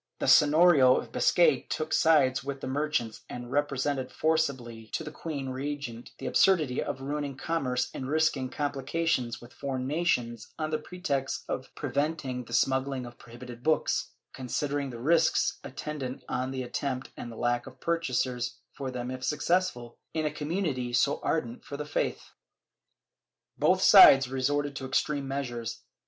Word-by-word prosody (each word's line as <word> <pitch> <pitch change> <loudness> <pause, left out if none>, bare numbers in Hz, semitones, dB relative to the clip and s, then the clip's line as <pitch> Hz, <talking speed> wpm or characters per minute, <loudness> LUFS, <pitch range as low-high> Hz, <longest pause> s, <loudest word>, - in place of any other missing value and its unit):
The - - -2
Seiiorio 150 -3 +6
of - - -5
Biscay - - +3
took 155 0 -2
sides 140 -5 +4
with 140 0 -5
the - - -4
merchants 130 -5 -1
and 120 0 -7
represented 140 -2 -1
forcibly 130 -8 -1
to - - -2
the 155 - -7
queen 145 -4 -5
regent 130 -3 -5
the - - -8
absurdity 155 -10 +3
of 135 - -4
ruining 140 0 -3
commerce 130 -6 -1
and 130 0 -5
risking 150 -4 +1
comphcations 140 -2 -1
with 120 +1 -14
foreign 130 -2 -3
nations 125 -7 -1
on 155 -1 -2
the 155 - 0
pretext 150 -5 -3
of 130 - -4
preventing 140 -2 -2
the - - -14
smuggUng 130 -1 +1
of 120 +1 -13
prohibited 120 0 -11
books, 155 +3 +1 0.3
considering 140 +2 -2
the 120 - -7
risks 160 +8 +2
attendant 135 -4 -6
on 130 +1 -2
the 130 -1 -3
attempt 130 +1 -3
and 120 - -7
the - - -9
lack 120 +1 0
of 130 0 -12
purchasers 130 -7 -1 0.2
for 135 -2 -5
them 125 0 -4
if 130 0 -6
successful, 150 -6 0 0.2
in 155 -1 0
a 150 - 0
community 150 -5 -2
so 140 +4 +2
ardent 120 -7 -2
for 140 - -7
the 150 - -4
faith.* 150 - -2 1.2
Both - - +2
sides 135 -1 +9
resorted 140 +2 -1
to 135 - -5
extreme 140 +1 0
measures. 120 -4 -4
135 Hz, 155 wpm, -28 LUFS, 125-150 Hz, 1.2 s, sides